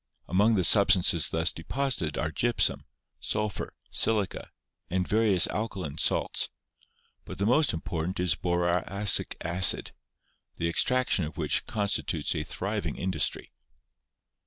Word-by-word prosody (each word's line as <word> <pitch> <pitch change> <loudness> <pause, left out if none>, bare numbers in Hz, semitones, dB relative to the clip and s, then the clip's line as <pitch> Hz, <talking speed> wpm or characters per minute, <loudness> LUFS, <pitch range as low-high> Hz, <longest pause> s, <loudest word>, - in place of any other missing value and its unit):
Among 105 +5 +3
the 95 - +1
substances 90 -5 +4
thus 80 +1 +1
deposited 100 - -3
are 80 - -2
gypsum, 120 +8 +1 0.3
sulphur, 105 -2 -3 0.2
silica, 105 -4 0 0.4
and 90 0 -1
various 105 -5 +3
alkaline 95 -9 -4
salts; - - +1 0.7
but - - -9
the 100 - -1
most 140 +7 +3
important 85 +1 -4
is 90 -2 +2
boracic 90 +3 0
acid, 85 +2 0 0.7
the 85 - -1
extraction 125 +3 +2
of 75 -1 -9
which - - 0
constitutes 105 -2 -1
a - - -2
thriving - - -4
industry. 85 -5 -1
95 Hz, 115 wpm, -28 LUFS, 85-105 Hz, 0.7 s, substances